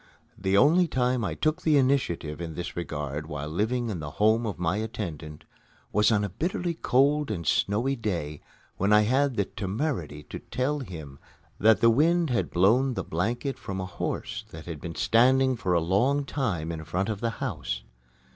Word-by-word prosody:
The 95 0 +1
only 165 - +5
time 125 -3 0
I - - -2
took 155 +3 0
the 155 -2 +3
initiative 125 - 0
in 80 -2 -5
this 90 - -5
regard 75 -3 -4
while 75 -2 -5
living 110 +8 -1
in 90 - -4
the 75 -1 -5
home 110 +2 +3
of 105 - -4
my 90 +2 0
attendant 85 -9 -5 0.5
was 105 +2 +4
on 105 -2 +2
a 100 - -2
bitterly 175 - -2
cold 145 0 +2
and 85 -6 -3
snowy 115 - +1
day 85 - -3 0.4
when 100 +2 +1
I 105 0 +7
had 130 +4 +2
the 100 - +1
temerity 95 - -3
to - - -8
tell 145 +4 -2
him 80 - -8 0.4
that 110 +1 +5
the 115 - +6
wind 165 +4 +3
had 120 - 0
blown 120 +9 +3
the - - -2
blanket 120 - -2
from 95 -1 -5
a 95 - -2
horse 90 - -4
that 80 0 -10
had 80 -4 -7
been 85 -1 -6
standing 130 +3 +4
for 95 -6 -1
a 85 - +4
long 120 - +1
time 90 - -2
in 80 -1 -5
front 90 +5 -2
of 105 -3 -3
the 115 - +1
house. - - -3
105 Hz, 185 wpm, -27 LUFS, 85-130 Hz, 0.5 s, I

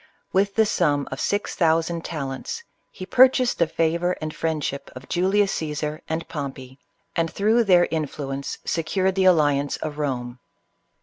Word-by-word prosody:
With 195 +1 +2
the 220 - +4
sum 150 -9 +1
of 135 - -5
MX 205 +5 0
thousand 165 0 +1
talents 150 - -5 0.3
he 185 - -8
purchased 255 +3 +4
the 170 - +4
favor 165 +2 0
and 155 0 -4
friendship 155 -4 -2
of 130 +1 -10
Julius 195 +3 +2
Caesar 150 -1 -2
M - - -2
CLEOPATRA. 155 - -12 0.2
and - - -13
Pompey, 135 -4 -6 0.4
and 165 -1 0
through 225 +3 +2
their 180 -3 +5
influence 140 -3 -3
secured 185 +4 0
the 190 0 +1
alliance 145 -5 +3
of 150 -1 -5
Eome. 125 -4 -3
160 Hz, 160 wpm, -24 LUFS, 145-185 Hz, 0.4 s, their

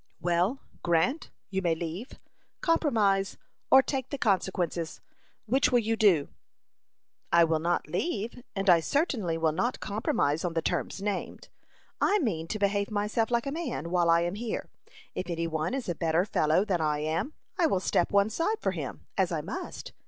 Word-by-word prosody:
"Well, 175 - +1 0.2
Grant, 175 - +1 0.2
you 190 0 0
may 170 -3 +1
leave, 170 - -5 0.5
compromise, 215 - +2 0.3
or 265 0 +8
take 265 -2 -3
the 280 - -3
consequences. 180 - 0 0.5
Which 260 +5 +2
will 245 - +5
you 225 -1 +1
do?" 190 -10 +4 1.0
"I 170 0 +6
will 160 -1 +2
not 170 0 0
leave; 220 - -2
and 195 0 -2
I 175 -2 +7
certainly 215 - 0
will 160 -1 +2
not 240 +11 -1
compromise 165 -7 0
on 175 -2 -1
the 165 - +2
terms 195 - -2
named. 205 -2 -4 0.5
I 410 - +4
mean 185 - -1
to 215 - -3
behave 200 0 +1
myself 215 +2 0
like 235 -1 +1
a 275 - -2
man, 275 - -4
while 175 -2 +3
I 165 0 +5
am 175 +1 -1
here. 225 +2 -4 0.4
If 185 - -4
any 170 -1 -1
one 160 +7 -1
is 270 - -4
a 175 - 0
better 165 +2 +1
fellow 160 -1 +2
than 185 -6 0
I 150 -1 +1
am, 160 - -2 0.3
I 335 - +5
will 195 - +1
step 175 -1 +1
one 200 +1 +3
side 375 - 0
for - - 0
him, - - -6
as - - +2
I - - -1
must. - - -6
195 Hz, 180 wpm, -28 LUFS, 170-235 Hz, 1.0 s, or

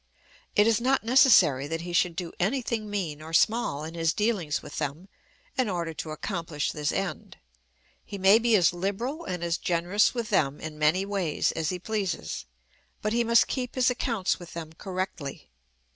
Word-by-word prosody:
It 205 - +5
is 225 0 +3
not 265 0 +2
necessary 195 - +5
that 165 +2 -3
he 175 +1 -6
should 175 -1 +2
do 175 -2 -4
any 235 +9 +1
thing 220 -2 -3
mean 170 -8 -3
or 160 +1 -9
small 165 -5 +2
in 160 +1 -6
his 165 -1 +1
dealings 205 -9 -1
with - - -7
them 150 +5 -4 0.5
in 250 -4 +2
order 170 -3 -2
to 160 - -6
accomplish 160 -2 -3
this 150 -1 -1
end. 195 -2 -4 0.7
He 200 - -7
may 195 +3 +6
be 235 -1 +3
as 180 -4 +4
liberal 205 - -3
and 180 -2 -4
as 170 0 -1
generous 180 +7 +1
with 235 -2 -3
them 140 -7 +1
in 155 -1 -7
many 160 +6 +3
ways 195 -6 0
as 160 -1 -2
he 180 - -2
pleases, 195 - -3 0.6
but 215 +1 0
he 235 0 +2
must 235 0 +5
keep 250 -2 -3
his 255 -1 +3
accounts 230 -6 -1
with 175 -1 -11
them 160 -1 -7
correctly. 185 - -5
185 Hz, 185 wpm, -27 LUFS, 165-220 Hz, 0.7 s, may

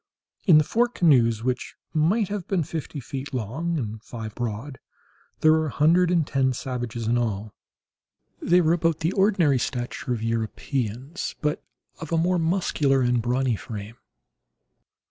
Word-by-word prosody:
In 165 -5 +8
the 155 - +5
four 235 +10 +2
canoes, 125 - +3
which 125 0 -2 0.2
might 180 +7 +2
have 200 -4 -4
been 185 -4 +1
fifty 155 0 -5
feet 135 +1 -6
long 140 +10 -2
and 110 -5 -4
five 110 -3 -7
broad, 120 +3 -5 0.6
there 155 - +6
were 160 0 +2
a 140 - -7
hundred 170 +4 +4
and 170 -3 +2
ten 135 -2 +1
savages 120 -2 -4
in 120 +2 +2
all. 110 -2 -3 0.9
They 180 +1 +4
were 165 0 +3
about 165 -2 0
the 165 +2 +1
ordinary 190 -9 +3
stature 120 0 -3
of 115 -2 -2
Europeans, 115 - -3
but 150 0 -1 0.4
of 160 - -8
a 165 - +2
more 175 +2 +2
muscular 160 -5 +1
and 120 -1 +2
brawny 125 +1 +1
frame. 105 0 -8
135 Hz, 155 wpm, -25 LUFS, 120-165 Hz, 0.9 s, In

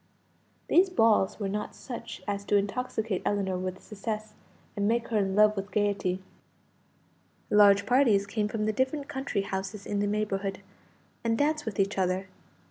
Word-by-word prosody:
These 375 +2 +5
balls 225 - +3
were 200 - -1
not 210 +2 -4
such 235 -2 -8
as 200 0 -2
to 205 - +1
intoxicate 215 0 -1
Ellinor 190 -3 0
with 185 0 -5
success, 215 0 -5 0.4
and 205 0 0
make 235 +1 0
her 225 - +1
in 195 -1 0
love 210 0 +5
with 195 0 -5
gaiety. 195 -3 0 1.3
Large 200 -1 +6
parties 230 -5 +4
came 210 +1 -1
from 215 0 -2
the 215 - +1
different 265 +4 -1
country 265 -8 -2
houses 195 +1 -5
in 205 - -2
the 205 - +1
neighbourhood, 200 -2 -2 0.6
and 225 -1 +1
danced 300 0 0
with 205 -3 -4
each 195 0 +1
other. 185 +1 0
205 Hz, 160 wpm, -28 LUFS, 195-225 Hz, 1.3 s, Large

